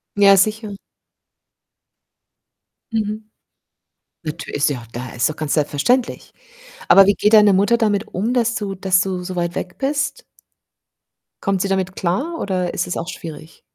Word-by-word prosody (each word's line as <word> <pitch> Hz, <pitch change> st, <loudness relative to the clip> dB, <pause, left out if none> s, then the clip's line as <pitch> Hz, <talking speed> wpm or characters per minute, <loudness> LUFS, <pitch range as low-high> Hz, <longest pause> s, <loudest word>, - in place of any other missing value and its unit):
Ja, 200 Hz, -1 st, +6 dB
sicher. 215 Hz, +1 st, 0 dB, 2.2 s
Mhm. 215 Hz, 0 st, -3 dB, 1.0 s
Natür 155 Hz, +1 st, -6 dB
ist 145 Hz, +1 st, +2 dB
ja 135 Hz, -4 st, -3 dB
auch 115 Hz, -, -13 dB
da 120 Hz, +1 st, -7 dB
ist 120 Hz, +4 st, 0 dB
doch 155 Hz, -, -7 dB
ganz 155 Hz, -2 st, -2 dB
selbstverständlich. 155 Hz, -, 0 dB, 0.6 s
Aber 195 Hz, -, +8 dB
wie 200 Hz, -, +4 dB
geht 210 Hz, +2 st, +1 dB
deine 210 Hz, -2 st, +7 dB
Mutter 205 Hz, +5 st, +3 dB
damit 215 Hz, -2 st, 0 dB
um, 215 Hz, +5 st, -2 dB
dass 235 Hz, -2 st, +1 dB
du 205 Hz, -3 st, -3 dB
dass 185 Hz, 0 st, +2 dB
du 185 Hz, -2 st, -3 dB
so 185 Hz, 0 st, -6 dB
weit 175 Hz, -1 st, -2 dB
weg 180 Hz, 0 st, -5 dB
bist? 280 Hz, 0 st, -2 dB, 1.2 s
Kommt 195 Hz, -2 st, 0 dB
sie 195 Hz, -, 0 dB
damit 190 Hz, -1 st, -1 dB
klar 270 Hz, -, -2 dB
oder 185 Hz, -2 st, -1 dB
ist 175 Hz, -, -1 dB
es 175 Hz, -, -4 dB
auch 165 Hz, -, -4 dB
schwierig? 165 Hz, -2 st, -9 dB
195 Hz, 155 wpm, -20 LUFS, 175-215 Hz, 2.2 s, Aber